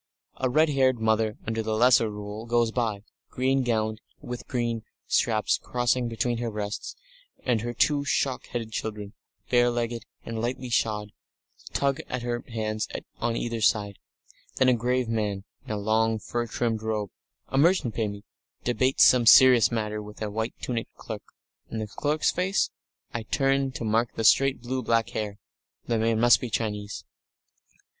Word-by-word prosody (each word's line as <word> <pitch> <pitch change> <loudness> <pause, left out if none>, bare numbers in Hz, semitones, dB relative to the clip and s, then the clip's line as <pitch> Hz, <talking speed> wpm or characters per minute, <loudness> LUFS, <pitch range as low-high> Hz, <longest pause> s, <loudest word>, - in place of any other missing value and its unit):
A 130 - 0
red 155 +5 +4
haired 130 -3 +3
mother 110 -1 +1
under 110 0 -1
the 110 0 -1
Lesser 120 -1 +5
Rule 105 +2 -7
goes 120 -1 +2
by, 110 -4 -1 0.3
green 135 +1 +1
gowned, 110 -3 -1 0.2
with 120 0 -6
dark - - -14
green 120 -3 -2 0.2
straps 110 -2 +1
crossing 125 0 0
between 115 +1 -1
her 120 -1 -2
breasts, 105 -1 -4 0.5
and 120 -4 +2
her 120 +1 -3
two 145 +4 +2
shock 135 -2 -1
headed 115 -2 -4
children, 105 -2 -5 0.4
bare 120 -1 +5
legged 120 -1 -2 0.2
and 115 -1 -4
lightly 125 +1 -3
shod, 105 -2 0 0.6
tug 140 -1 0
at 125 -1 -3
her 120 0 -2
hands 110 -2 -2 0.3
on 115 0 0
either 115 -1 -3
side. 105 -2 +1 0.6
Then 130 - +4
a - - +5
grave 125 +1 0
man 105 -3 -1 0.2
in - - -5
a 105 - -1
long, 110 +2 +1
fur 120 +2 -3
trimmed 115 -1 -1
robe, 110 -3 -2 0.4
a 135 - +1
merchant, 160 - +3
maybe, 105 -2 -3 0.4
debates 130 +2 +3
some 125 -2 +5
serious 125 -3 +8
matter 105 -2 -2
with 105 0 -11
a 105 - -3
white 110 +2 -3
tunicked 115 -2 -4
clerk. - - -7 0.5
And 110 - -4
the 110 - -2
clerk's 150 +8 0
face? 185 +2 0 0.4
I 120 - -2
turn 135 +3 +1
to - - -5
mark 115 +2 +1
the 115 - -2
straight, 135 +2 +4
blue 130 +1 -2
black 115 -1 +1
hair. 105 -2 -3 0.5
The 115 -1 0
man 115 0 +1
must 120 -3 +6
be 125 - -3
Chinese.... 105 -2 -3
115 Hz, 165 wpm, -26 LUFS, 110-125 Hz, 0.6 s, serious